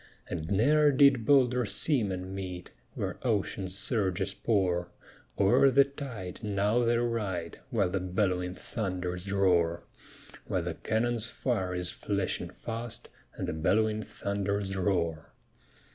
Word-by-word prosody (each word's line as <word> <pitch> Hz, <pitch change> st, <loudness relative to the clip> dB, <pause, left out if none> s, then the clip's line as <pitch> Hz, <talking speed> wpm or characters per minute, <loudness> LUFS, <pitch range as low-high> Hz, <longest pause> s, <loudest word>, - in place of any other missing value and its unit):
And 80 Hz, +1 st, -4 dB
ne'er 145 Hz, +9 st, +4 dB
did 135 Hz, -4 st, +4 dB
bolder 125 Hz, -3 st, +4 dB
seamen 100 Hz, -, 0 dB
meet, 90 Hz, -2 st, -6 dB, 0.2 s
Where -, -, -3 dB
ocean's 100 Hz, -4 st, -1 dB
surges 95 Hz, -4 st, +1 dB
pour; 95 Hz, -6 st, 0 dB, 0.5 s
O'er 100 Hz, +7 st, +5 dB
the 140 Hz, +1 st, +6 dB
tide 135 Hz, -10 st, -7 dB
now 105 Hz, +2 st, +1 dB
they 120 Hz, 0 st, +3 dB
ride, 105 Hz, -8 st, -2 dB
While 100 Hz, -6 st, +1 dB
the 95 Hz, -, 0 dB
bell'wing 90 Hz, -1 st, -1 dB
thunders 90 Hz, -3 st, -4 dB
roar, 90 Hz, -4 st, +2 dB, 0.6 s
While -, -, -1 dB
the -, -, -3 dB
cannon's 115 Hz, 0 st, -1 dB
fire 95 Hz, -8 st, -1 dB
is 90 Hz, 0 st, -1 dB
flashing 100 Hz, -3 st, -2 dB
fast, 115 Hz, 0 st, -6 dB, 0.3 s
And -, -, -4 dB
the -, -, -2 dB
bell'wing 105 Hz, +7 st, +1 dB
thunders 100 Hz, -1 st, -2 dB
roar. 85 Hz, -5 st, -1 dB
100 Hz, 125 wpm, -29 LUFS, 90-115 Hz, 0.6 s, the